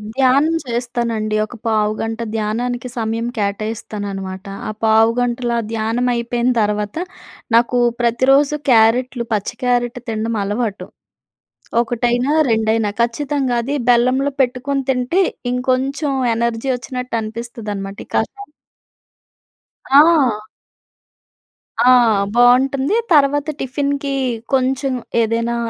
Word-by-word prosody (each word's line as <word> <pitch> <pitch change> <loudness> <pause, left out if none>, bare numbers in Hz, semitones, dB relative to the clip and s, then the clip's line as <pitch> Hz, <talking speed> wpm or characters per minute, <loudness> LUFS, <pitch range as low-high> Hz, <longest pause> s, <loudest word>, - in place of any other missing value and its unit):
ధ్యానం 275 +5 +3
చేస్తానండి. 235 -3 -2
ఒక 215 - -12
పావుగంట 220 +1 -1 0.2
ధ్యానానికి 240 +3 -2
సమయం 225 +1 -2
కేటాయిస్తానన్నమాట. 200 -2 -4 0.2
ఆ - - -2
పావుగంటలో 235 +2 +2
ఆ - - -3
ధ్యానం 225 +3 -1
అయిపోయిన 240 +1 0
తర్వాత, 210 0 -1 0.6
నాకు 240 +1 +3 0.2
ప్రతిరోజు 270 +5 +3 0.2
క్యారెట్‌లు 235 +2 +3
పచ్చి 210 +3 -2
క్యారట్ 245 0 0
తినడం 225 +1 -2
అలవాటు, 210 0 -3 0.9
ఒకటైనా, 240 +3 0 0.2
రెండైనా 220 -1 +1
ఖచ్చితంగా. 265 +2 -1
అది 275 +4 -2
బెల్లంలో 255 +4 +3
పెట్టుకొని 265 +2 -1
తింటే, 255 +9 +1 0.3
ఇంకొంచెం 260 +4 -1 0.2
ఎనర్జీ 235 +2 -1
వచ్చినట్టు 250 -1 -5
అనిపిస్తది 225 0 -6
అన్నమాట. 195 0 -6
ఈ - - -47
కషాయం 405 0 -2 1.4
ఆ! 280 -5 +5 1.5
ఆ! - - +8 0.5
బావుంటుంది. 265 - +4 0.2
తర్వాత 290 0 +3
టిఫిన్‌కి 280 +1 -2 0.4
కొంచెం 265 +1 +1 0.3
ఏదైనా 230 +1 0
240 Hz, 95 wpm, -18 LUFS, 225-265 Hz, 1.5 s, ఆ